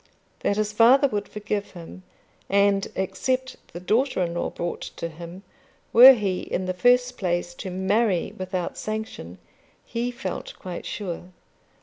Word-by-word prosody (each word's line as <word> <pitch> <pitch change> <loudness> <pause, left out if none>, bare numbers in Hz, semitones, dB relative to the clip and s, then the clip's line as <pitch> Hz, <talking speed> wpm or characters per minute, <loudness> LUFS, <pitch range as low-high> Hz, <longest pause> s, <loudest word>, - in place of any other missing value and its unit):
That 200 - 0
his 210 0 -1
father 250 +6 +6
would 205 -3 -3
forgive 210 -1 -4
him 175 +1 -10 0.5
and 200 0 +3
accept 260 +7 -2 0.2
the 175 - -7
daughter 220 +3 +1
in 170 -1 -3
law 175 - -2
brought 175 - -4
to 170 - -4
him, 170 +4 -10 0.5
were 255 +3 +11
he 200 -6 -1
in 185 - -3
the 185 - -1
first 245 +5 +3
place 175 -2 -1
to 185 - -7
marry 190 +1 0
without 185 -1 -4
sanction, 215 - -5 0.5
he 235 +1 -2
felt 245 +2 -6
quite 180 -2 -7
sure. 180 -4 -5
200 Hz, 145 wpm, -24 LUFS, 180-230 Hz, 0.5 s, were